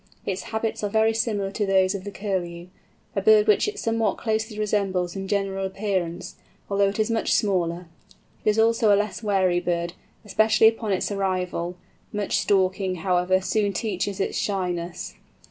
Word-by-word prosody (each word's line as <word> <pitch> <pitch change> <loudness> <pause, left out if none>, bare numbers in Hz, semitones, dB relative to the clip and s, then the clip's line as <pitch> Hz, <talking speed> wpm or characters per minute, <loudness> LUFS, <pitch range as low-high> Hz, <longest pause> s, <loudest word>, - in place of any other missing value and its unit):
Its 190 -1 -2
habits 220 0 -2
are 205 - 0
very 220 +2 +3
similar 215 -3 -1
to 210 - -2
those 190 -1 +3
of 195 -1 -6
the - - -4
Curlew—a 180 -3 -5
bird 435 -1 +6
which 425 0 +3
it 420 0 -4
somewhat 225 - 0
closely 220 -1 -2
resembles 195 -4 0
in 195 0 -4
general 195 -1 -1
appearance, 190 -3 -3 0.3
although 200 0 +3
it 200 - -5
is 215 +1 +1
much 225 - 0
smaller. 180 -4 0 0.6
It - - +3
is 210 - +1
also 225 -1 +4
a 200 - +6
less 210 +1 -2
wary 190 -4 +2
bird, 170 -1 -2 0.3
especially 220 +2 +4
upon 225 -1 0
its 190 +2 0
arrival; 180 -3 -2 0.3
much 205 -1 0
stalking, 190 -1 +1
however, 180 0 +2
soon 200 +1 0
teaches 200 -1 -2
it - - -1
shyness. 180 -3 -3
195 Hz, 160 wpm, -24 LUFS, 185-215 Hz, 0.6 s, bird